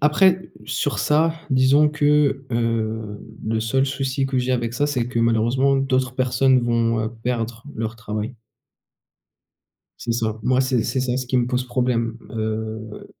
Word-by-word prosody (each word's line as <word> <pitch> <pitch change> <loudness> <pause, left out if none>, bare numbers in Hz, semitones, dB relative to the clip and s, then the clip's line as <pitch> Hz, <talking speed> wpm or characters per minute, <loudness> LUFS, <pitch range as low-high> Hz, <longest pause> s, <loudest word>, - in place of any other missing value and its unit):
après 180 +5 +3 0.2
sur - - -1
ça, 160 +2 +2 0.2
disons 135 +3 +5
que, 145 -2 +2
heu, 110 -2 -1 0.2
le 110 +1 0
seul 130 +5 +1
souci 135 0 -1
que 135 -1 0
j'ai 125 +1 0
avec 120 -2 -1
ça, 145 +4 +1
c'est 130 -5 -1
que, 125 - -2
malheureusement, 115 +4 +2
d'autres 130 -2 0
personnes 130 0 +3
vont, 115 -1 +1
heu, 110 - -1 0.2
perdre 115 -1 -2
leur 110 +1 -4
travail. 110 +2 -5 1.6
C'est 120 - -2
ça, 110 -2 -1
moi, 130 +2 +2
c'est 130 -3 +1
c'est 130 - -1
ça 125 -1 -1
ce 130 -1 -3
qui 130 - 0
me 120 - +1
pose 125 0 -1
problème, 120 -2 0
heu 110 -1 -4
125 Hz, 160 wpm, -22 LUFS, 115-135 Hz, 1.6 s, disons